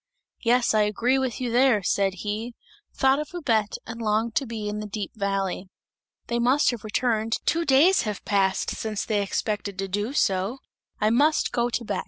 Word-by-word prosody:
"Yes, 240 0 +3
I 215 - +4
agree 235 +5 +1
with 260 -4 -2
you 250 -2 -2
there!" 245 -4 +3
said 195 +1 +1
he; 220 +3 -3 0.4
thought 270 +1 +2
of 300 - -4
Babette 225 -11 0
and 230 +1 -7
longed 220 +1 0
to 275 - 0
be 220 -2 -5
in 210 0 -3
the 210 - -5
deep 205 0 -5
valley. 195 -2 -2 0.6
"They 235 0 -1
must 260 +5 +3
have 235 -3 -7
returned, 225 0 0
two 335 0 +1
days 305 +8 +5
have 210 -3 -5
passed 195 -1 +1
since 215 -2 -3
they 210 -2 0
expected 200 0 -3
to 195 0 -2
do 205 +6 -2
so. 195 -2 +1 0.4
I 215 0 +2
must 295 +6 +3
go 240 0 0
to 235 0 -3
Bex!" - - -2
220 Hz, 190 wpm, -25 LUFS, 205-250 Hz, 0.6 s, days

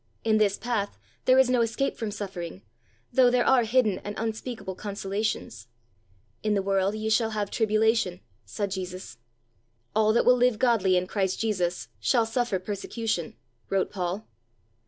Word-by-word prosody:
In 220 -1 +3
this 205 -2 +2
path 215 -3 -2 0.3
there 255 0 +5
is 265 -1 +6
no 250 -1 +2
escape 230 +4 0
from 225 - -3
suffering, 185 - -6 0.5
though 250 0 +6
there 245 0 +2
are 255 -3 +4
hidden 220 -4 +2
and 205 0 -6
unspeakable 225 -2 -4
consolations. 200 - -3 0.7
"In 215 -1 +1
the 195 - 0
world 195 +1 +1
ye 215 0 -3
shall 220 +1 +2
have 205 -1 -2
tribulation," 220 -4 +2 0.2
said 195 - -4
Jesus. 185 -9 -6 0.8
"All 215 0 +4
that 235 - +3
will 250 - +7
live 245 -2 +3
godly 215 -7 +3
in 180 - 0
Christ 190 -1 -1
Jesus 185 -6 -1
shall 235 -3 +2
suffer 230 -2 0
persecution," 205 0 -3 0.3
wrote 195 -1 0
Paul. 185 +2 -3
215 Hz, 155 wpm, -27 LUFS, 190-230 Hz, 0.8 s, will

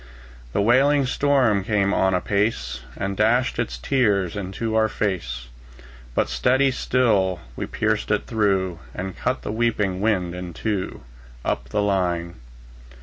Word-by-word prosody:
The 100 - +2
wailing 135 +5 +4
storm 130 -7 +2
came 100 -1 +1
on 95 0 +2
apace, 90 - 0 0.2
And 100 0 -2
dashed 115 +5 +2
its 60 +1 -2
tears 100 - +1
into 105 +3 -3
our 110 0 +3
fade; 100 -4 -1 0.9
But - - +2
steadily 130 +2 +2
still 105 -9 +1 0.2
we - - -4
pierced - - -1
it - - +1
through, 95 -5 0 0.2
And 95 0 -4
cut 130 - -2
the - - -3
sweeping 105 -5 0
wind 95 -5 +1
in 90 -1 -6
two, 100 - -3 0.4
Up 60 +3 -2
the 105 -1 0
line. 90 -4 0
100 Hz, 140 wpm, -23 LUFS, 90-115 Hz, 0.9 s, wailing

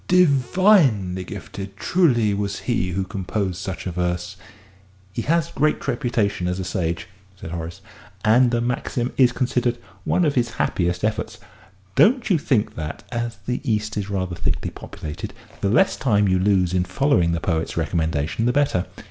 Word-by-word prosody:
"Divinely 140 - +4
gifted 100 +2 -8
truly 120 - +3
was 100 0 -2
he 115 -7 0
who 95 +2 0
composed 95 0 -3
such 95 0 -5
a 90 - -2
verse!" 90 +1 -2 0.8
"He 115 - -2
has 165 +4 +1
a - - -17
great 155 -1 +1
reputation 120 -8 0
as 90 +1 -2
a - - -2
sage," 85 -2 -2 0.3
said 80 - -7
Horace, 85 +2 -6 0.4
"and 120 +3 +5
the 120 0 0
maxim 125 +1 -2
is 125 -2 +5
considered 125 -1 0 0.3
one 180 - +2
of 150 - +2
his 120 -3 0
happiest 90 0 0
efforts. 110 0 -1 0.6
Don't 240 - +4
you 170 - +4
think 125 -7 +1
that, 75 -1 -6
as 120 -2 -3
the 125 - -2
East 110 -4 -1
is 100 -2 -3
rather 95 -3 -2
thickly - - -2
populated, 75 -1 -7 0.2
the 100 - 0
less 115 - +4
time 105 -6 +2
you 95 -1 +3
lose 95 -2 +2
in 90 -1 +2
following 90 - +2
the 85 - 0
poet's 80 -1 -2
recommendation 80 +3 0
the - - +4
better?" 135 -10 +1
105 Hz, 165 wpm, -22 LUFS, 90-125 Hz, 0.8 s, and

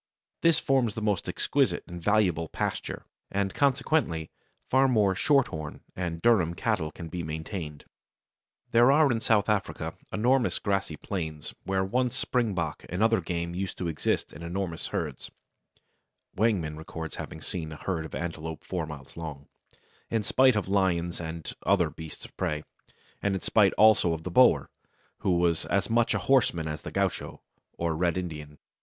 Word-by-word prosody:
This 165 -2 +5
forms 130 -6 +1
the 110 - -3
most 105 -4 0
exquisite - - +1
and 85 0 -8
valuable 90 -5 +2
pasture, - - -3 0.2
and 100 -1 -1
consequently 135 - +1 0.4
far 135 +1 +4
more 105 -6 +3
Shorthorn 95 - +1
and 85 -2 -3
Durham 95 -8 +4
cattle 80 -2 0
can 85 +1 -8
be 85 +2 -4
maintained. 80 -1 -5 0.9
There 120 +3 +6
are 150 -1 +5
in 115 - +1
South 110 -2 +3
Africa 105 -2 -1 0.2
enormous 125 +3 +2
grassy 95 -6 -1
plains, 80 -6 -5
where 95 0 +1
once 125 +5 0
springbok 95 -11 -1
and 90 +5 0
other 115 0 +4
game 85 -1 -3
used 95 +2 -3
to 90 - -2
exist 80 -2 -1
in - - -10
enormous 85 0 -3
herds - - -4 1.1
(Wangeman 95 -8 +1
records 80 0 -7
having 80 - -6
seen 80 -1 -4
a - - -6
herd 85 -2 -2
of 80 - -7
antelope 80 -1 -5
four 90 -2 -3
miles 70 -4 -10
long), 75 -4 -7 0.6
in 115 -2 0
spite 130 +3 +4
of 105 -3 -1
lions 90 -3 +1
and 80 -1 -5
other 90 -5 +3
beasts 80 0 -9
of - - -14
prey, 75 0 -1 0.6
and 100 -1 +1
in 95 - -3
spite 100 -1 +4
also 105 -6 +5
of 80 0 -5
the 90 - -4
Boer, 125 +7 +5 0.5
who 90 -2 +2
was 85 -2 +2
as 100 +2 0
much 120 0 +3
a - - -2
horseman 105 -12 +3
as 75 -1 -4
the - - -7
gaucho - - -2 0.3
or 85 -1 0
Red 85 +2 +1
Indian. 75 -5 -5
90 Hz, 160 wpm, -28 LUFS, 80-110 Hz, 1.1 s, There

